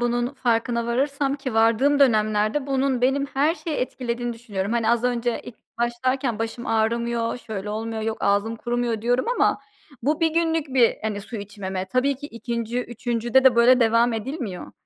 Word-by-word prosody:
bunun 240 Hz, 0 st, +1 dB
farkına 235 Hz, -1 st, 0 dB
varırsam 275 Hz, +3 st, 0 dB
ki 265 Hz, -5 st, -5 dB
vardığım 230 Hz, +6 st, +3 dB
dönemlerde 215 Hz, +1 st, +2 dB
bunun 270 Hz, -2 st, 0 dB
benim 270 Hz, +3 st, +2 dB
her 285 Hz, +4 st, +1 dB
şeyi 310 Hz, -1 st, -4 dB
etkilediğini 240 Hz, -1 st, -3 dB
düşünüyorum. 215 Hz, -3 st, -4 dB
Hani, 230 Hz, -2 st, +1 dB
az 235 Hz, +1 st, +1 dB
önce 240 Hz, -1 st, 0 dB
ilk 235 Hz, -, -9 dB, 0.2 s
başlarken 240 Hz, 0 st, -1 dB
başım 225 Hz, +2 st, -4 dB
ağrımıyor, 230 Hz, +1 st, 0 dB
şöyle 210 Hz, -3 st, -6 dB
olmuyor, 220 Hz, +1 st, -3 dB
yok 220 Hz, 0 st, -2 dB
ağzım 205 Hz, +3 st, +1 dB
kurumuyor, 240 Hz, -2 st, -2 dB
diyorum 245 Hz, -, +1 dB
ama -, -, +2 dB, 0.4 s
bu 300 Hz, +5 st, 0 dB
1 325 Hz, -, +4 dB
günlük 325 Hz, -2 st, +1 dB
bir, 255 Hz, -3 st, +3 dB
hani, 210 Hz, -2 st, -2 dB
su 225 Hz, +3 st, -7 dB
içmeme. 195 Hz, -2 st, -5 dB
Tabii 255 Hz, +7 st, +1 dB
ki 290 Hz, +1 st, -8 dB
2'nci, 235 Hz, -1 st, -3 dB
3'üncüde 240 Hz, +1 st, 0 dB
de 250 Hz, -3 st, +6 dB
böyle 245 Hz, +2 st, +6 dB
devam 230 Hz, +1 st, +3 dB
edilmiyor. 225 Hz, -, -5 dB
235 Hz, 165 wpm, -23 LUFS, 225-260 Hz, 0.4 s, de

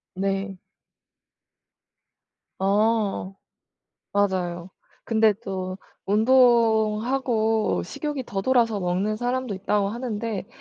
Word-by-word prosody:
네. 195 Hz, 0 st, -2 dB, 2.0 s
어. 205 Hz, -1 st, +1 dB, 0.8 s
맞아요. 185 Hz, -3 st, -1 dB, 0.4 s
근데 220 Hz, -2 st, +3 dB
또 185 Hz, -1 st, -4 dB, 0.3 s
"운동하고 225 Hz, -, +2 dB
식욕이 290 Hz, -, -4 dB
더 195 Hz, -3 st, -3 dB
돌아서 230 Hz, -2 st, +2 dB
먹는 190 Hz, +4 st, -1 dB
사람도 245 Hz, -2 st, -2 dB
있다."고 200 Hz, +1 st, 0 dB
하는데 225 Hz, -3 st, -4 dB
215 Hz, 170 characters per minute, -24 LUFS, 195-230 Hz, 2.0 s, 근데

